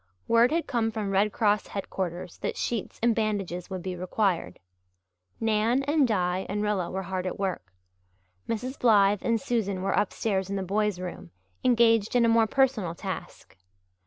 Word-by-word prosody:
Word 230 +3 +5
had 330 +1 0
come 230 -3 0
from 215 -3 -3
Red 200 +2 +2
Cross 210 -1 +1
headquarters 180 -3 -5
that - - -3
sheets 230 -4 -3
and 235 -1 +4
bandages 200 -5 -2
would 185 -2 -5
be 185 -1 -4
required. 185 0 -1 0.8
Nan 225 +4 +2
and 290 -1 +3
Di 185 -3 0
and 205 +1 -1
Rilla 205 -4 0
were 190 +1 -3
hard 185 0 -3
at - - -4
work. 185 - -3 0.8
Mrs. 250 +4 -3
Blythe 205 -4 +4
and 230 -1 +1
Susan 210 -8 -1
were 195 - 0
upstairs 195 -2 0
in 200 - -2
the 195 - -2
boys' 205 0 0
room, 180 - -7 0.3
engaged 230 -3 +3
in 240 -1 +5
a - - +3
more 225 -1 +4
personal 220 -9 +1
task. - - -7
210 Hz, 165 wpm, -27 LUFS, 190-230 Hz, 0.8 s, Word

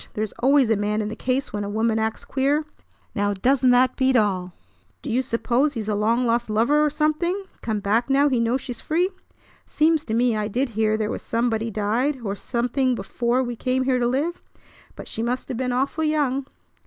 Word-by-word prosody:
There's 215 -1 -2
always 270 0 +4
a - - +4
man 210 +1 -1
in 210 - -3
the 220 - -5
case 255 +1 -2
when 205 -1 -2
a 200 - -4
woman 220 +1 +1
acts 220 0 -2
queer! 280 +3 0 0.5
Now, 205 0 0
doesn't 255 +5 +2
that 250 +1 +4
beat 260 -1 +2
all? 190 -5 +1 0.5
Do 275 - -4
you 245 +3 +2
suppose 260 +3 0
he's 220 -2 -4
a 215 - 0
long 225 +4 +1
lost 235 0 0
lover 240 +8 +3
or 300 - +3
something, 310 +6 0 0.2
come 215 -2 -2
back 225 +6 +1
now 280 +2 +4
he 260 -4 +1
knows 235 +3 +1
she's 245 -3 -7
free? 345 +4 +1 0.6
Seems 315 0 +2
to 220 - -2
me 240 -1 +2
I 210 -1 -1
did 250 +5 -1
hear 215 -1 +1
there 215 -1 -1
was - - -4
somebody 230 -1 -1
died 225 +7 0
or 200 -3 -2
something 245 +4 -1
before 235 +5 -1
we 240 -1 -4
came 255 +2 0
here 255 -1 +1
to 240 - +1
live, 290 +8 -1 0.5
but - - -9
she 225 - -5
must 245 +2 -2
have 245 - -3
been 255 0 -1
awful 275 +5 -1
young." 280 -3 0
245 Hz, 210 wpm, -23 LUFS, 220-270 Hz, 0.6 s, always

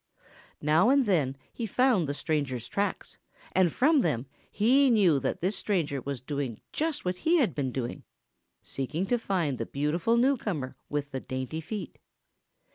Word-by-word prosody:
Now 155 +9 +4
and 275 -1 +4
then 145 - +1 0.2
he 230 - -3
found 225 - +2
the 140 - -2
stranger's 140 -7 -1
tracks, 200 +1 -3 0.3
and 185 -3 +3
from 290 - +4
them 120 - 0 0.2
he 260 +6 +4
knew 190 - +4
that - - -2
this 185 +5 +1
stranger 160 -9 -1
was 135 -1 -5
doing 135 -4 -4
just 310 -5 -1
what 180 0 -1
he 330 - +3
had 245 - +2
been 130 -1 -2
doing, 125 -2 -4 0.6
seeking 150 +7 -3
to 240 +4 +1
find 170 - -1
the 115 - -2
beautiful 165 +11 0
newcomer 215 - 0
with 145 -1 -3
the 135 - -3
dainty 130 +5 -4
feet. 205 +6 -6
165 Hz, 160 wpm, -28 LUFS, 140-225 Hz, 0.6 s, Now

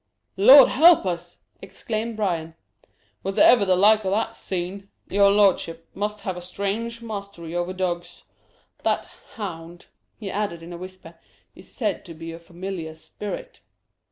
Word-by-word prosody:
"Lord 255 +7 +9
help 325 - +6
us!" 175 -1 -4 0.2
exclaimed 220 +3 -5
Bryan; 165 -6 -2 0.7
"was 195 0 -4
ever 235 -4 +6
the 185 -1 +3
like 210 +3 +5
o' 190 - -1
that 210 +4 -1
seen? 190 +2 -5 0.2
Your 200 0 +4
lordship 185 -5 +2
must 210 +1 -3
have 185 - -3
a 180 - -7
strange 205 +6 -4
mastery 200 -6 -7
over 175 +1 -1
dogs. 180 -2 -4 0.6
That - - 0 0.3
hound," 175 -5 -8 0.3
he 200 -4 -6
added, 195 -5 -3
in 175 +1 -9
a - - -7
whisper, 185 -3 -11 0.3
"is - - -13
said 215 -7 -2
to 170 -3 -10
be 165 +1 -8
a 165 - -9
familiar 170 -1 -7
spirit." 200 +5 -8
190 Hz, 150 wpm, -24 LUFS, 175-210 Hz, 0.7 s, Lord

